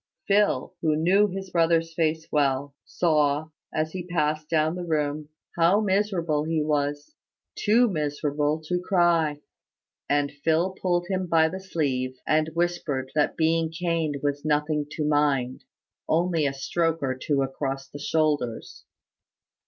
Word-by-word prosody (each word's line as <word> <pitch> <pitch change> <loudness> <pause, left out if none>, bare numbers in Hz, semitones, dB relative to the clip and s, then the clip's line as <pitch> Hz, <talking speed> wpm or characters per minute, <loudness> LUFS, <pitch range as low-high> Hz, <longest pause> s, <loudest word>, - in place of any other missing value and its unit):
Phil, 205 -2 +2
who 155 -2 +2
knew 185 +7 +4
his 190 -1 -6
brother's 165 -1 +2
face 160 -1 0
well, 140 -1 +1
saw, 155 -2 +1 0.2
as 155 0 -1
he 180 0 -6
passed 155 -3 -1
down 155 -1 +2
the 180 0 -5
room, 150 -2 -2 0.3
how 170 +5 +4
miserable 190 -7 0
he 160 0 -1
was 145 - -1 0.4
too 230 +4 +3
miserable 150 -3 -1
to 180 +2 -1
cry; 170 -5 +2 0.7
and 145 0 +1
Phil 160 +5 0
pulled 175 -2 -1
him 185 -2 -2
by 160 -1 +4
the 185 +4 -5
sleeve, 135 -9 -2
and 155 0 +2
whispered 170 -6 -1
that 150 -1 +1
being 160 0 +1
caned 165 -3 -1
was 145 0 -1
nothing 150 0 0
to 150 0 -3
mind 140 -4 +1 0.4
only 165 -2 +2
a 135 - -2
stroke 165 +4 0
or 130 -1 0
two 140 +1 0
across 135 0 -4
the 145 - -10
shoulders. 145 -7 -1
155 Hz, 140 wpm, -25 LUFS, 145-175 Hz, 0.7 s, knew